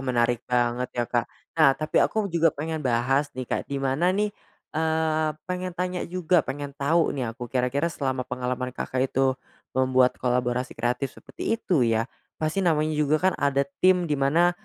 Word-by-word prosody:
menarik 120 -2 +1
banget 120 0 +1
ya, 120 - +1
Kak. 120 0 0 0.3
Nah, 145 -3 +7
tapi 155 0 -3
aku 220 -1 +1
juga 165 -1 +4
pengen 160 +2 -3
bahas 135 +2 +1
nih, 130 - -3
Kak, - - -1
di 140 - -1
mana 135 +7 +1
nih, 210 +1 0 0.4
eee, 160 0 +1 0.2
pengen 180 0 -3
tanya 180 0 -2
juga, 180 -1 +2
pengen 140 +1 -5
tahu 160 +4 +2
nih 125 -5 -2
aku, 125 -1 -6
kira-kira 130 +4 +1
selama 130 -4 -2
pengalaman 125 0 -3
Kakak 130 +1 -1
itu 135 0 +2 0.4
membuat 130 -1 +3
kolaborasi 125 0 0
kreatif 125 +3 -1
seperti - - -3
itu 170 - +1
ya, 115 0 +1 0.4
pasti 155 +5 0
namanya 155 -3 +2
juga 150 +1 +3
kan - - -5
ada 140 -1 +2 0.2
tim 185 -1 +5
di - - +3
mana 160 +6 +4
140 Hz, 170 wpm, -25 LUFS, 125-160 Hz, 0.4 s, Nah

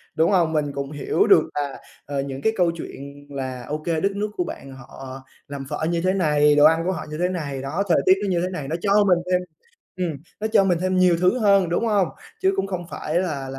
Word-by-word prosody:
đúng 165 +5 +3
hông? 170 -4 +2
Mình 145 -2 0
cũng 140 +1 -4
hiểu 145 -2 0
được - - +6
là, 145 -2 -3 0.3
ờ, 140 -1 -2
những 135 0 -6
cái 220 - +1
câu 175 -2 +2
chuyện 145 -3 -9
là, 130 -3 -5
ô 150 - -2
kê, 160 0 -2
đất 195 - +1
nước 210 +1 -2
của 180 - +1
bạn 135 -5 -8
họ 130 +1 -10 0.3
làm 140 -1 -6
phở 155 - -2
như 170 -1 0
thế 185 +1 +1
này, 150 -5 +3
đồ 145 0 +6
ăn 165 +1 +4
của 185 - +1
họ 185 - -5
như 155 - -5
thế 180 - +2
này, 145 -7 -4
đó, 155 +9 -2
thời - - +4
tiết 185 - +7
nó 200 - -1
như 175 -2 +1
thế 180 - -1
này, 150 -7 -5
nó 160 - -2
cho 205 0 +4
mình 180 -2 +4
thêm 180 0 +3 0.6
ừm, 180 -3 -1 0.3
nó 220 - -1
cho 215 -3 +4
mình 175 -3 +2
thêm 185 0 0
nhiều 180 -2 +4
thứ 185 +8 +3
hơn, 200 -5 +4
đúng 200 +7 0
hông? 200 -6 +2 0.3
Chứ 190 +1 +3
cũng 195 0 0
không 180 -3 -4
phải 160 +3 -2
là 145 -7 -3
là 135 0 -7
165 Hz, 260 wpm, -23 LUFS, 145-185 Hz, 0.6 s, tiết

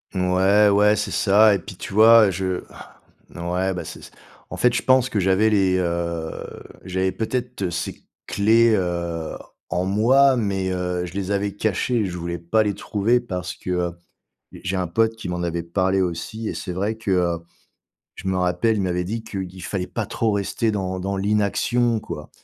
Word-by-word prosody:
Ouais, 95 +3 +4
ouais, 105 +1 +4
c'est 105 - -2
ça 105 +1 +5
et 100 - 0
puis, 90 - -10
tu 90 - -8
vois, 110 -1 +7
je 95 0 -2 0.7
ouais, 90 +2 -1
bah, 85 -2 -5
c'est - - -8 0.5
en - - -6
fait, 125 0 +3
je 120 - 0
pense 130 -1 +4
que 105 - -1
j'avais 95 +3 +3
les, 95 -3 +3
heu, 85 -2 -3 0.2
j'avais 95 0 -1
peut-être 115 0 -3
ces 85 - -5 0.2
clés, 115 +3 +4
heu, 85 -3 -2 0.3
en 90 0 -1
moi. 130 +8 +4
Mais, 95 -4 -1
heu, 90 -1 -2
je 90 - -9
les 95 0 -3
avais 100 0 -1
cachées 110 +4 0
et 110 - +1
je 90 -2 -4
voulais 85 0 -4
pas 85 +7 +2
les 105 -1 0
trouver 110 +4 +1
parce 90 -7 -5
que, 90 - -9
heu, 90 -1 0 0.6
j'ai 95 +1 -4
un 90 -1 -1
pote 110 +6 +1
qui 110 -5 -7
m'en 90 0 -3
avait 85 0 -2
parlé 95 +3 0
aussi 90 +5 -3
et - - -4
c'est 90 - -5
vrai 100 +5 -1
que, 110 -2 -4
heu, 90 -2 +1 0.8
je 95 - -7
me 95 - 0
rappelle, 90 +5 +1
il 105 - 0
m'avait 90 -1 -1
dit 110 +4 -4
qu'il 95 -4 -6
fallait 90 -1 -3
pas - - -3
trop 115 -1 -1
rester 100 +3 0
dans 95 -2 -3
dans 100 +2 -2
l'inaction, 105 +3 +1
quoi 75 -6 -7
95 Hz, 185 wpm, -22 LUFS, 90-110 Hz, 0.8 s, vois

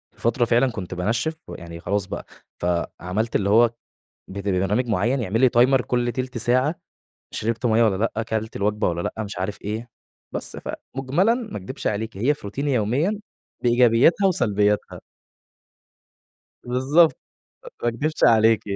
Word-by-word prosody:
في - - -20
فترة 120 +1 +2
فعلًا 120 +2 +3
كنت 95 -4 -6
بانشّف 115 - -1
ويعني 85 -1 -9
خلاص 100 +2 -1
بقى، 95 - -6 0.4
فعملت 90 +5 -2
اللي 100 0 +1
هو 115 +2 +5 0.6
بت 100 +1 -5
برنامج 95 +6 +1
معيّن 115 +5 +1
يعمل 115 +2 -1
لي 130 - +6
timer 130 +1 +5
كُلّ 120 +1 0
تِلت 130 -2 -4
ساعة، 130 +7 +2 0.6
شربت 115 +2 -1
مَيّة 115 0 +4
والّا 100 -4 +2 0.2
لأ، 110 - -1
كلت 110 0 -3
الوجبة 105 +2 0
والّا 85 -1 -2
لأ؟ 110 - -3
مش 100 -2 -7
عارف 95 +2 -3
إيه، 110 +4 -4 0.4
بس - - -3
فمجملًا 145 - -1
ما 235 -4 -6
اكدبش 100 +7 -7
عليكِ، 110 0 -2
هي 130 +9 +2
في - - -17
روتيني 140 +7 -2
يوميًا 140 - 0 0.4
بإيجابياتها 120 - +4
وسلبياتها. 105 - 0 1.6
بالضبط، 135 +7 +3 0.7
ما 120 - +2
اكدبش 145 +7 0
عليكِ. 115 -1 +5
115 Hz, 145 wpm, -23 LUFS, 105-130 Hz, 1.6 s, لي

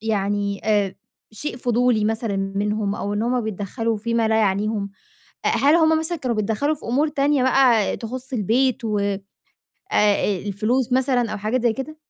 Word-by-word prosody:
يعني 205 -2 -1
آآ 205 -3 +1 0.4
شيء 240 +5 -5
فضولي 245 -2 +1
مثلًا 220 -1 -1
منهم 200 +1 -1
أو 205 0 -3
إن 210 - -1
هُم 245 +2 +1
بيتدّخلوا 220 +2 -3
في 230 +2 -3
ما 225 -1 +2
لا 220 - +2
يعنيهم، 205 0 0 0.5
آآ - - +3
هل 285 +3 +3
هُم 320 -1 +4
مثلًا 320 +2 -2
كانوا 250 -5 -2
بيتدخلوا 220 +8 0
في 295 - -12
أمور 275 +6 +1
تانية 285 -2 +1
بقى 255 -5 +3
تخص 255 +4 -7
البيت 245 +3 +1
و 215 -2 0 0.7
آآ 210 - +1
الفلوس 230 +5 0
مثلًا 250 -3 +2
أو 215 - -4
حاجات 220 +5 -1
زي 240 -2 +3
كده؟ 270 +6 -6
225 Hz, 170 wpm, -22 LUFS, 210-260 Hz, 0.7 s, هُم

